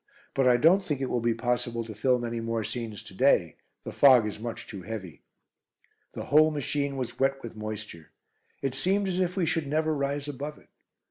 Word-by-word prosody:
"But 135 Hz, -2 st, +2 dB
I 125 Hz, -1 st, +6 dB
don't 170 Hz, +9 st, +5 dB
think 150 Hz, -8 st, -3 dB
it 135 Hz, -, -2 dB
will 125 Hz, -, +1 dB
be 115 Hz, 0 st, +1 dB
possible 120 Hz, 0 st, -1 dB
to 110 Hz, -1 st, -8 dB
film 125 Hz, +2 st, +1 dB
any 115 Hz, 0 st, -3 dB
more 115 Hz, -1 st, -2 dB
scenes 115 Hz, -2 st, -5 dB
to -, -, -12 dB
day; 95 Hz, -, +3 dB, 0.3 s
the -, -, -6 dB
fog 130 Hz, -5 st, +6 dB
is 105 Hz, 0 st, -4 dB
much 115 Hz, +1 st, -6 dB
too 100 Hz, -3 st, -8 dB
heavy." 95 Hz, -3 st, -7 dB, 0.9 s
The -, -, -6 dB
whole 155 Hz, +2 st, +5 dB
machine 145 Hz, -1 st, -2 dB
was 125 Hz, -3 st, -5 dB
wet 135 Hz, 0 st, +1 dB
with 115 Hz, -1 st, -7 dB
moisture. 105 Hz, -6 st, -7 dB, 0.5 s
It 135 Hz, -2 st, 0 dB
seemed 190 Hz, +9 st, +1 dB
as 185 Hz, -1 st, -1 dB
if 180 Hz, 0 st, 0 dB
we 180 Hz, -, +2 dB
should 160 Hz, -2 st, -1 dB
never 155 Hz, +2 st, +1 dB
rise 140 Hz, 0 st, -2 dB
above 145 Hz, +1 st, -5 dB
it. -, -, -21 dB
130 Hz, 205 wpm, -28 LUFS, 115-145 Hz, 0.9 s, I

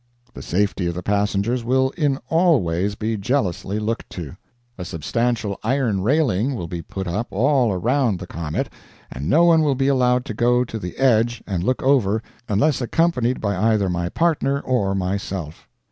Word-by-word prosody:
The -, -, -9 dB
safety 95 Hz, -1 st, 0 dB
of 85 Hz, -, -2 dB
the 90 Hz, -, -5 dB
passengers 105 Hz, +4 st, 0 dB
will 130 Hz, +2 st, +2 dB
in 145 Hz, -5 st, 0 dB
all 165 Hz, -, +3 dB
ways 90 Hz, +5 st, -1 dB
be 110 Hz, +1 st, -2 dB
jealously 100 Hz, -, -1 dB
looked 110 Hz, +2 st, -3 dB
to. 80 Hz, -7 st, -7 dB, 0.4 s
A 90 Hz, -, -6 dB
substantial 105 Hz, +5 st, -2 dB
iron 115 Hz, -5 st, 0 dB
railing 130 Hz, -, +1 dB
will 90 Hz, -, -4 dB
be 85 Hz, 0 st, -5 dB
put 95 Hz, +4 st, -6 dB
up 105 Hz, +8 st, -2 dB
all 125 Hz, +2 st, +2 dB
around 115 Hz, +3 st, +1 dB
the 90 Hz, -, -7 dB
comet, 80 Hz, -3 st, -4 dB, 0.4 s
and 70 Hz, +5 st, -4 dB
no 165 Hz, +4 st, +5 dB
one 165 Hz, -2 st, +5 dB
will 145 Hz, -3 st, +2 dB
be 135 Hz, +1 st, +1 dB
allowed 125 Hz, -2 st, +2 dB
to 110 Hz, -, -5 dB
go 120 Hz, +3 st, +2 dB
to 115 Hz, -2 st, -6 dB
the 90 Hz, -4 st, -7 dB
edge 120 Hz, -3 st, +2 dB
and 95 Hz, -4 st, -2 dB
look 130 Hz, +6 st, 0 dB
over 115 Hz, -6 st, +2 dB, 0.3 s
unless 135 Hz, +8 st, +2 dB
accompanied 125 Hz, -2 st, +1 dB
by 100 Hz, -2 st, -1 dB
either 105 Hz, -1 st, +2 dB
my 85 Hz, 0 st, -2 dB
partner 145 Hz, -, +1 dB
or 100 Hz, -7 st, 0 dB
myself. 95 Hz, -4 st, -4 dB
110 Hz, 175 wpm, -21 LUFS, 95-130 Hz, 0.4 s, no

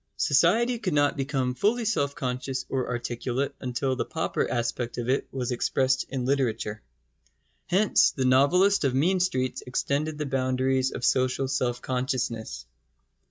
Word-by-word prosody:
Society 235 Hz, +1 st, +3 dB
could 185 Hz, -8 st, -2 dB
not 145 Hz, +2 st, +3 dB
become 135 Hz, -3 st, -1 dB
fully 220 Hz, -, +1 dB
self 140 Hz, -10 st, 0 dB
conscious 130 Hz, 0 st, -3 dB
or 130 Hz, -2 st, -2 dB
articulate 125 Hz, +2 st, -2 dB
until 130 Hz, +1 st, -1 dB
the -, -, -1 dB
pauper -, -, -2 dB
aspect 120 Hz, 0 st, -2 dB
of 120 Hz, -1 st, -3 dB
it 130 Hz, +2 st, 0 dB
was 125 Hz, -2 st, -3 dB
expressed 130 Hz, +2 st, +1 dB
in 130 Hz, -2 st, -3 dB
literature. 120 Hz, -5 st, -1 dB, 0.9 s
Hence 195 Hz, +4 st, +4 dB
the 130 Hz, -, -2 dB
novelist 165 Hz, +11 st, +4 dB
of 135 Hz, -2 st, +1 dB
mean 180 Hz, +8 st, +2 dB
streets 130 Hz, -9 st, -1 dB
extended 145 Hz, +4 st, -1 dB
the 150 Hz, -, -3 dB
boundaries 130 Hz, -1 st, +1 dB
of 125 Hz, -, -4 dB
social 130 Hz, +1 st, +1 dB
self 125 Hz, -2 st, -1 dB
consciousness. 120 Hz, -, -3 dB
130 Hz, 145 wpm, -26 LUFS, 125-145 Hz, 0.9 s, Hence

